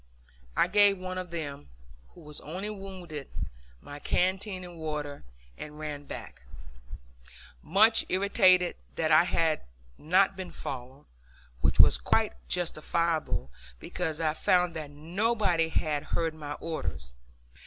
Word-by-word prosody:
I - - +5
gave 200 +1 +6
one 185 0 -4
of 180 -1 -6
them, 145 -4 -6 0.5
who 175 - -13
was 150 -1 -8
only 185 +7 -5
wounded, 185 -7 -8 0.5
my 145 0 -9
canteen 185 +3 0
of 175 -1 -9
water, 150 - -5 0.4
and 150 0 -8
ran 150 -2 -5
back, - - -8 1.2
much 215 +7 +5
irritated 185 -2 +4 0.2
that 160 -1 0
I 155 +3 +7
had 165 -3 +1 0.4
not 190 +4 +3
been 190 -1 -6
followed 130 +2 -7 0.5
which - - +1
was - - +7
quite - - +2
unjustifiable, 165 - -1 0.3
because 160 - -3
I 155 -2 +1
found 180 +1 +2
that 155 -2 -5
nobody 175 +2 0
had 150 -2 0
heard 165 +1 -1
my 150 -2 -6
orders. 145 - -5
165 Hz, 125 wpm, -29 LUFS, 150-185 Hz, 1.2 s, I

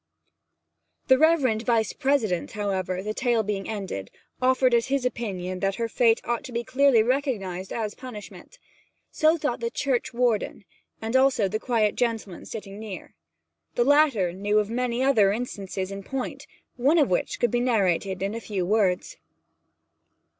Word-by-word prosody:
The 260 0 +6
reverend 285 -9 +3
the - - -12
Vice 225 -4 +1
President, 225 -11 0
however, 190 -3 -2
the 215 +1 -3
tale 240 -2 +1
being 200 -2 -3
ended, 190 - -5 0.3
offered 255 0 +3
as 235 -1 +3
his 270 -1 0
opinion 185 -7 -3
that 195 0 0
her 230 -1 -2
fate 230 0 +3
ought 240 -1 -2
to - - -8
be 235 0 -2
quite 255 - -19
clearly 265 -4 +5
recognized 215 -8 -2
as 215 -3 -3
a - - -27
punishment. 255 - -10 0.5
So 315 +2 +3
thought 290 -6 -2
the 235 0 -2
Churchwarden, 240 -5 -1 0.4
and 225 +3 -2
also 260 -6 +4
the 215 +3 -2
quiet 220 -4 +1
gentleman 225 -7 -3
sitting 205 -2 -8
near. 215 -4 -8 0.6
The 240 - +3
latter 270 - +3
knew 205 +3 +1
many 240 +3 -1
other 220 -8 +4
instances 200 -4 -4
in 195 0 -6
point, 255 +5 -5 0.3
one 280 +7 +3
of 290 - +3
which 175 - -1
could 240 - +2
be 240 - +1
narrated 195 -6 +1
in 200 +2 -1
a 230 - -5
few 195 -5 -3
words. 205 - +1
225 Hz, 160 wpm, -25 LUFS, 195-255 Hz, 0.6 s, The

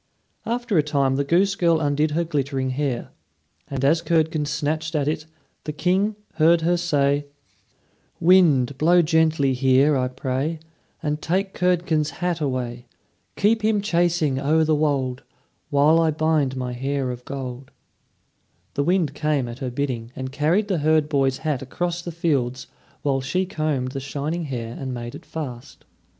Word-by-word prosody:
After 235 -6 0
a - - +6
time 140 -3 +1
the 140 - +1
goose 180 +7 +2
girl 170 -3 +3
undid 150 0 +1
her 165 +3 0
glittering 140 -4 -1
hair; 130 -2 -2 0.6
and 135 -1 -2
as 160 +4 +3
Curdken 160 -2 +1
snatched 155 +3 -2
at 145 -2 +1
it, 155 0 -2 0.4
the 150 - -2
King 185 +7 +1 0.2
heard 165 +1 +5
her 175 +2 +2
say: 145 -4 +1 0.9
"Wind, 150 -7 +4
blow 175 +3 +5
gently 160 -4 +2
here, 135 +3 +3
I 130 -1 +1
pray, 130 +5 -2 0.5
And 150 0 -1
take 190 +3 -1
Curdken's 170 -4 +1
hat 175 -2 -1
away. 125 -3 -3 0.5
Keep 220 +2 +2
him 215 -1 +2
chasing 170 -7 +1
o'er 155 +3 +2
the 155 0 +2
wold, 140 -4 0 0.5
While 150 +3 +4
I 165 -1 +3
bind 155 -4 +1
my 125 -1 -3
hair 135 +1 -2
of 125 0 -8
gold." 130 -1 -6 1.0
The 140 - 0
wind 170 -3 +1
came 150 -4 0
at 120 +2 -8
her 130 - -3
bidding, 125 -3 -3
and 130 0 -5
carried 160 +9 +1
the 185 -5 0
herd 155 0 +2
boy's 135 -3 +1
hat 150 -5 0
across 175 +6 -3
the 175 - -6
fields; 135 -7 -1 0.4
while 135 -2 +1
she 180 +8 -1
combed 155 -7 -2
the 135 - -4
shining 150 +5 -3
hair 120 -4 -5
and 130 -2 -4
made 120 0 -6
it - - -11
fast. 125 -7 -7
150 Hz, 160 wpm, -23 LUFS, 135-165 Hz, 1.0 s, a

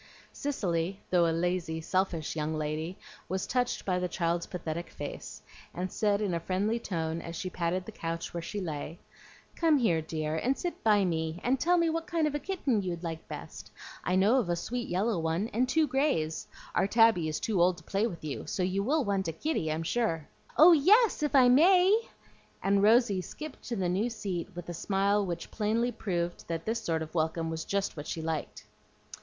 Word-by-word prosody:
Cicely, 190 - -2
though 175 -2 +4
a - - +2
lazy, 170 -1 -1
selfish 170 -2 -1
young 155 0 -1
lady, 155 +3 -3 0.3
was 190 0 -1
touched 250 -1 -1
by 180 -2 +1
the 180 - -1
child's 170 -1 -1
pathetic 170 -1 -5
face, 145 - -7 0.3
and 180 +1 -3
said 205 -1 +1
in 200 -4 0
a 170 - 0
friendly 195 +7 0
tone, 165 -5 -3
as 170 - -7
she 185 +2 -4
patted 180 +1 -1
the - - -8
couch 165 -4 -4
where 170 - -3
she 205 +5 -5
lay, 160 -2 -5 0.6
"Come 325 -3 +4
here, 180 -11 +2
dear, 155 -1 -3
and 260 +10 0
sit 350 - -4
by 210 -3 +4
me, 160 -1 -2
and 255 +2 +2
tell 355 +1 +3
me 335 -1 +3
what 330 +1 -2
kind 335 -3 +1
of 300 - 0
a 295 - -1
kitten 285 - 0
you'd 180 -2 -4
like 165 -1 -5
best. - - -8 0.3
I 180 - +1
know 210 +8 +4
of 205 -8 -2
a 175 - +2
sweet 240 +7 -4
yellow 195 +2 +1
one, 165 +7 -1
and 250 +4 0
two 320 +3 +3
grays. 265 - 0 0.3
Our - - +2
Tabby 225 -6 +4
is 155 - -2
too 205 -6 0
old 180 0 +4
to 160 - -13
play 200 +6 0
with 170 -8 -8
you; 145 - -5
so 185 - -1
you 190 +2 0
will 285 +7 +1
want 195 -2 0
a - - 0
kitty, 165 - -2
I'm 160 +1 -2
sure." 165 -5 -1 0.3
"Oh 325 +4 +9
yes, 380 - +5
if 295 -1 0
I 255 -2 +7
may!" 365 - +5 0.5
and 200 0 +3
Rosy 215 -2 +4
skipped 305 - -8
to 235 - -3
the 190 -4 0
new 195 +7 +1
seat 195 -7 -4
with 175 -1 -7
a 175 - -4
smile 200 +4 +1
which 175 -3 -5
plainly 225 +3 0
proved 175 -6 -3
that 165 -1 -3
this 225 +1 -1
sort 160 -1 0
of 155 - -10
welcome 165 0 0
was 160 0 -4
just 200 0 -1
what 150 -1 -7
she 160 - -4
liked. 160 -1 -4
185 Hz, 205 wpm, -30 LUFS, 165-235 Hz, 0.6 s, Oh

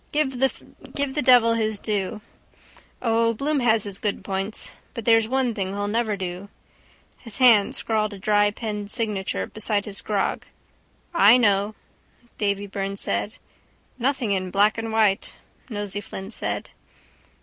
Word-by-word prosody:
Give 275 -4 0
the 275 +2 -2
devil 245 -3 +6
his 220 -2 -1
due. 210 0 -2 0.8
O, 230 -1 +2
Bloom 290 +5 0
has 225 -4 +3
his 200 -2 -4
good 205 -2 -2
points. 195 +2 -2 0.2
But 230 - -5
there's 225 -1 +4
one 260 -1 0
thing 195 -2 -3
he'll 205 0 -2
never 215 -1 0
do. 185 +1 -6 0.7
His 225 -5 -6
hand 230 -6 +5
scrawled 215 -1 -1
a 200 - -8
dry 205 +1 +3
pen 210 -1 -5
signature 210 -3 -1
beside 210 -1 -1
his 205 -1 -4
grog. 205 -2 -1 0.7
—I 245 -8 +7
know, 205 -2 +2 0.6
Davy 200 -1 0
Byrne 195 0 -4
said. 205 - -2 0.7
—Nothing 255 -3 0
in 185 -2 -1
black 205 +4 +3
and 225 0 -4
white, 215 -3 +1 0.3
Nosey 205 -2 -3
Flynn 195 0 -8
said. - - -3
215 Hz, 140 wpm, -24 LUFS, 200-230 Hz, 0.8 s, I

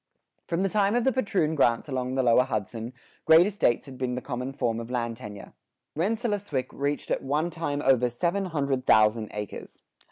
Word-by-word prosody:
From 175 +1 0
the 195 - +1
time 205 +2 +2
of 245 - +2
the 265 - +3
patroon 200 -11 0
grants 120 -5 +2
along 130 -2 -2
the 130 - +1
lower 120 0 +5
Hudson, 115 0 -4 0.3
great 160 +2 +7
estates 195 - +1
had 130 -2 -11
been 125 -1 -1
the - - -2
common 125 0 -4
form 115 -4 -1
of 115 0 -7
land 120 -2 -2
tenure. 105 -4 -10 0.4
Rensselaerswyck 205 - -1
reached 145 +1 -3
at - - 0
one 150 +5 -1
time 145 -3 -3
over 125 -2 +3
seven 175 +11 -1
hundred 140 -6 -2
thousand 110 0 +4
acres. 105 0 -8
135 Hz, 185 wpm, -27 LUFS, 120-170 Hz, 0.4 s, great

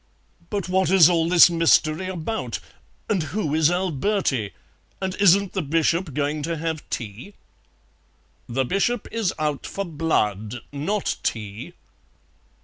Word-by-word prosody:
"But 200 -4 -3
what 185 0 +1
is 180 -3 +7
all 165 -1 +1
this 175 -1 +8
mystery 165 0 +2
about? 185 +4 -3 0.5
And 200 -5 +1
who 155 0 -2
is 155 0 +4
Alberti? 175 - 0 0.5
And 190 -1 -2
isn't 200 0 +4
the 190 - -1
Bishop 165 0 0
going 150 +1 -1
to 165 +2 -3
have 160 -1 -3
tea?" 115 - -6 1.1
"The 130 +2 0
Bishop 200 - 0
is 225 -5 0
out 150 -2 -2
for 200 - -4
blood, 120 - -1
not 185 +9 -2
tea." 105 -2 -4
165 Hz, 130 wpm, -23 LUFS, 145-190 Hz, 1.1 s, this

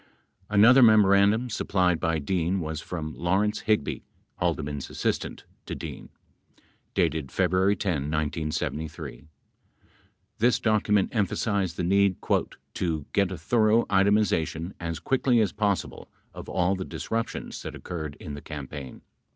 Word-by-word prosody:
22 - - -11
Another 125 +5 +8
memorandum 105 +1 +5
supplied 90 -6 +1
by 80 -1 0
Dean 90 +4 0
was 80 -2 -4
from 80 -3 -5
Lawrence 100 +5 0
Hig 105 -9 +3
by, - - -4 0.4
Haldeman 75 -1 -1
's - - -8
assistant, - - -2 0.2
to - - -4
Dean, - - -8 0.9
dated 80 -5 0
February 95 +2 +2
10, 80 -9 -2
1973. 75 0 -3 1.1
This 120 0 +3
docu 110 -2 +1
ment 105 +2 +2
emphasized 100 -3 0
the - - -1
need 100 +1 +3 0.6
"to 80 -5 -2
get 100 -2 +2
a 95 - -4
thorough 110 +6 +3
itemization 95 -4 +2
as 85 -1 -3
quickly 130 -2 +2
as 105 -4 +2
possible 100 -3 -2 0.2
of - - -9
all 95 +1 +1
the 95 - -4
disruptions 115 +4 -4
that - - -7
occurred 80 -4 -6
in 75 - -7
the 75 - -7
campaign 70 -2 -8
95 Hz, 135 wpm, -26 LUFS, 80-105 Hz, 1.1 s, Another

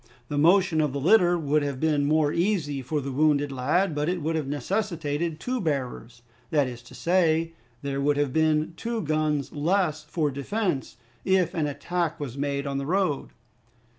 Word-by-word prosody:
The 145 - -2
motion 175 0 +4
of 150 -3 0
the 140 - -2
litter 175 +3 +4
would 150 -1 +1
have 140 -2 -3
been 150 -2 +2
more 155 0 +2
easy 170 -7 0
for 145 +4 -2
the 135 0 -4
wounded 145 0 +2
lad, 155 +8 +1
but 150 +2 -1
it 180 0 -1
would 160 +1 -1
have 155 -4 -2
necessitated 160 - -2
two 250 +5 -2
bearers, 125 -6 -3 0.3
that 145 -3 +3
is 120 -1 -7
to 120 - -14
say, 165 -2 +2 0.3
there 140 0 -2
would 145 +1 +2
have 145 -3 0
been 155 0 +2
two 230 +2 -3
guns 155 -2 0
less 155 0 0
for 150 -1 -1
defense 140 - -2 0.3
if 190 -3 +2
an 160 -5 0
attack 170 +3 -2
was 135 -5 -5
made 140 0 -2
on 140 -1 -2
the 140 - -4
road. 180 -5 0
155 Hz, 180 wpm, -26 LUFS, 140-170 Hz, 0.3 s, motion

